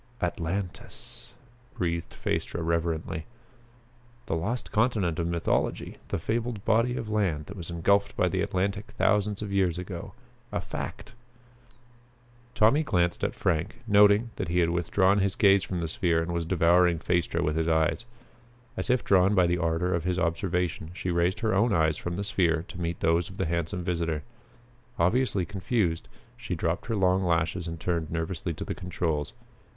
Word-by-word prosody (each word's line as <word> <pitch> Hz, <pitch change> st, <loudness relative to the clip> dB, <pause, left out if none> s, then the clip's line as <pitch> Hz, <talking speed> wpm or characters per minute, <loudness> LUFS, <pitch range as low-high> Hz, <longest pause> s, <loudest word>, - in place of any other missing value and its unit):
"Atlantis!" 90 Hz, +2 st, -4 dB, 0.4 s
breathed 85 Hz, -2 st, -2 dB
Phaestra 85 Hz, -, -2 dB
reverently. 80 Hz, -1 st, -1 dB, 1.0 s
The -, -, -1 dB
lost 110 Hz, +10 st, -3 dB
continent 105 Hz, -8 st, +1 dB
of 85 Hz, -, 0 dB
mythology! 85 Hz, -1 st, -1 dB
The -, -, -2 dB
fabled 115 Hz, +3 st, -2 dB
body 115 Hz, +3 st, +2 dB
of 115 Hz, -, -4 dB
land 95 Hz, -9 st, 0 dB
that 100 Hz, -, -9 dB
was 90 Hz, -4 st, -7 dB
engulfed 100 Hz, +4 st, +1 dB
by -, -, +3 dB
the -, -, 0 dB
Atlantic 100 Hz, +2 st, -1 dB
thousands 105 Hz, 0 st, +2 dB
of 100 Hz, -, -5 dB
years 95 Hz, -4 st, +1 dB
ago 90 Hz, -1 st, -6 dB, 0.4 s
a -, -, -1 dB
fact! -, -, -6 dB, 1.4 s
Tommy 115 Hz, +7 st, +5 dB
glanced 90 Hz, -, 0 dB
at -, -, 0 dB
Frank, 80 Hz, 0 st, 0 dB
noting 105 Hz, +2 st, +5 dB
that -, -, -2 dB
he 85 Hz, +1 st, -1 dB
had 85 Hz, -1 st, +3 dB
withdrawn 95 Hz, +3 st, +2 dB
his 95 Hz, 0 st, +1 dB
gaze 100 Hz, -2 st, +5 dB
from 90 Hz, -2 st, -3 dB
the 80 Hz, -, -1 dB
sphere 85 Hz, 0 st, +1 dB
and 85 Hz, +1 st, -4 dB
was 85 Hz, -1 st, -2 dB
devouring 85 Hz, 0 st, +4 dB
Phaestra 85 Hz, +1 st, 0 dB
with 75 Hz, -, 0 dB
his 80 Hz, 0 st, 0 dB
eyes. 80 Hz, +7 st, +1 dB, 0.7 s
As -, -, -4 dB
if 125 Hz, 0 st, +2 dB
drawn 95 Hz, +1 st, +4 dB
by 90 Hz, -2 st, +5 dB
the 85 Hz, 0 st, +1 dB
ardor 85 Hz, +2 st, 0 dB
of 85 Hz, -2 st, 0 dB
his 90 Hz, 0 st, 0 dB
observation, 85 Hz, -2 st, -1 dB
she 90 Hz, -1 st, -2 dB
raised 85 Hz, +5 st, +1 dB
her 110 Hz, -3 st, +1 dB
own 105 Hz, +3 st, +3 dB
eyes 80 Hz, -3 st, +2 dB
from 85 Hz, 0 st, -4 dB
the 100 Hz, -, -2 dB
sphere 85 Hz, -5 st, +1 dB
to 90 Hz, -1 st, -7 dB
meet 85 Hz, 0 st, -3 dB
those 85 Hz, +1 st, +2 dB
of -, -, -11 dB
the -, -, 0 dB
handsome 85 Hz, +2 st, -2 dB
visitor. 85 Hz, -3 st, -1 dB, 0.7 s
Obviously 100 Hz, 0 st, +2 dB
confused, 95 Hz, -3 st, -1 dB, 0.3 s
she 115 Hz, -6 st, -4 dB
dropped 85 Hz, +5 st, -2 dB
her 115 Hz, -, -1 dB
long 95 Hz, -1 st, +2 dB
lashes 85 Hz, 0 st, 0 dB
and 85 Hz, 0 st, -5 dB
turned 85 Hz, -2 st, -1 dB
nervously 85 Hz, +1 st, -3 dB
to -, -, -5 dB
the -, -, -3 dB
controls. 80 Hz, -5 st, -2 dB
90 Hz, 170 wpm, -27 LUFS, 85-100 Hz, 1.4 s, Tommy